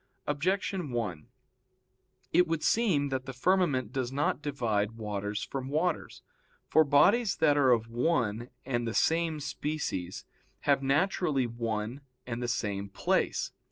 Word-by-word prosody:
Objection 180 +2 -1
1: 105 -11 -3 1.1
It 180 +1 +5
would 160 -1 -1
seem 180 -12 +2
that 130 0 -3
the 135 - -5
firmament 130 - +1
does 130 -2 -2
not 140 0 0
divide 115 -7 -1
waters 105 -2 -4
from 135 -1 -5
waters. 160 +3 -1 0.4
For 160 - +5
bodies 195 - +4
that 155 -3 +3
are 140 -3 +4
of 115 -2 +3
one 120 -3 0 0.2
and 120 -3 -1
the 115 - -3
same 165 -1 +2
species 140 - -4 0.4
have 140 -2 +2
naturally 145 -1 +1
one 115 +1 -3 0.2
and 120 -1 -4
the 120 - -1
same 100 -4 -2
place. - - 0
135 Hz, 135 wpm, -30 LUFS, 115-155 Hz, 1.1 s, It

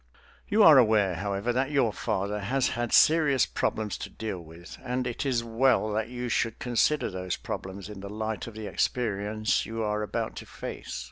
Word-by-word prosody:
You 210 +1 +4
are 155 -7 +9
aware, 105 -5 +3
however, 100 +5 -2
that 130 +2 0
your 135 -7 +2
father 105 -2 -2
has 125 +6 0
had 120 -1 -3
serious 150 -5 +5
problems 110 -2 -2
to - - -6
deal 105 -4 -5
with, 85 +1 -12
and 125 0 -2
it 125 +3 -3
is 120 -3 +1
well 115 -1 +2
that 110 +2 -1
you 125 0 -4
should 115 -1 0
consider 125 +2 +1
those 90 -1 -3
problems 95 0 -6
in 105 -2 -9
the 100 +1 -7
light 110 +1 -4
of 115 - -9
the 110 -1 -6
experiences 110 -1 0
you 115 0 -3
are 105 0 -1
about 105 - -3
to - - -8
face. - - -7
110 Hz, 190 wpm, -28 LUFS, 100-125 Hz, -, are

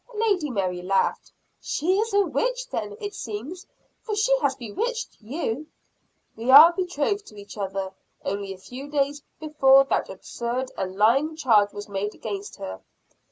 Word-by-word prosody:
Lady 405 -8 +1
Mary 185 -6 -2
laughed. 190 +2 0 0.3
"She 365 +6 0
is 450 +1 0
a 405 0 +4
witch - - -1
then, 425 +1 -4
it 410 -2 -5
seems; 275 - -6 0.3
for 430 -3 -3
she 465 +4 +3
has - - +1
bewitched 455 - -4
you." 270 +3 -3 0.7
"We 225 +2 -6
were 300 +6 +10
betrothed 370 +2 -1
to 210 - -13
each 200 - -11
other 195 -2 -4 0.3
only 200 0 -3
a 190 - -7
few 255 +9 -9
days 290 0 0 0.2
before 275 -3 +5
that - - +1
absurd 245 +2 -4
and 185 0 -4
lying 265 +10 +3
charge 220 -9 +3
was 205 +1 -8
made 205 +1 -3
against 205 -2 -6
her." 95 0 -7
265 Hz, 160 wpm, -25 LUFS, -, 0.7 s, were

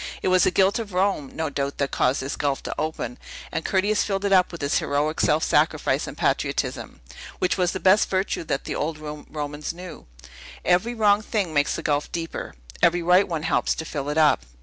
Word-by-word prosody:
It - - +2
was 185 -1 +4
the - - +4
guilt 190 +4 +2
of 210 -4 -6
Rome, 185 -7 0
no 160 -2 -2
doubt, 140 0 -3
that 140 -1 -1
caused 130 +1 +1
this 135 - -3
gulf 140 -2 -1
to - - -4
open; 160 +11 -4 0.3
and - - -2
Curtius 205 +2 +1
filled 195 -1 -2
it 200 - +2
up 185 -1 +4
with 170 - -8
his 140 0 +1
heroic 145 +2 -1
self 155 +1 +2
sacrifice - - +1
and - - -8
patriotism, - - -1 0.4
which 180 - +1
was 180 -2 +1
the 190 - -4
best 190 +3 +4
virtue 190 -2 -1
that 140 -2 -2
the - - -4
old 155 +1 -2
Romans 150 0 -6
knew. 180 - -10 0.6
Every 180 +7 +2
wrong 210 -2 +4
thing 205 -6 -2
makes 145 -1 +2
the 165 - -5
gulf 145 -1 0
deeper; 165 -1 -5 0.3
every 175 0 +3
right 180 +3 +4
one 165 -4 -3
helps 165 - +1
to 160 - -5
fill 145 -2 -4
it 150 - -2
up. 150 - +4
165 Hz, 210 wpm, -24 LUFS, 150-190 Hz, 0.6 s, was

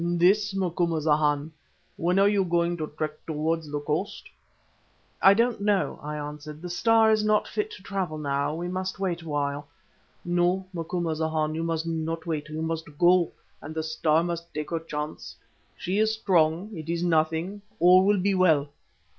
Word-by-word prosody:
"This, 195 +4 +3
Macumazahn. 155 -5 +1 0.4
When 175 +3 0
are 195 +1 +5
you 205 -1 +3
going 170 -1 +1
to 155 -2 -3
trek 155 0 -4
towards 160 0 -1
the 145 - -1
coast?" 150 +7 -3 0.9
"I 195 +1 +7
don't 235 -1 +1
know," 200 -2 +1
I 150 +1 -5
answered. 150 +1 -7
"The 180 - -5
Star 225 +4 +4
is 215 -1 +2
not 215 0 +2
fit 425 0 -2
to - - -12
travel 185 -6 -3
now, 145 0 -1
we 175 +2 -4
must 185 +1 -3
wait 180 -3 -1
awhile." 145 -2 -3 0.6
"No, 175 +2 +1
Macumazahn, 160 -2 -1
you 160 - -3
must 165 -1 -1
not 165 0 -3
wait, 155 -3 -3
you 155 +1 -4
must 160 -2 -4
go, 175 0 +4 0.3
and 155 +2 -8
the 160 - -1
Star 155 0 +1
must 170 -1 -4
take 150 +1 -4
her 165 - 0
chance. 150 -1 -6 0.4
She 190 +4 -1
is 220 0 +3
strong. 180 0 +1
It 160 -1 -7
is 170 0 -1
nothing. 165 +4 0 0.2
All 180 +2 +7
will 205 0 +3
be 200 +2 +1
well." 160 -6 +3
165 Hz, 170 wpm, -26 LUFS, 155-185 Hz, 0.9 s, I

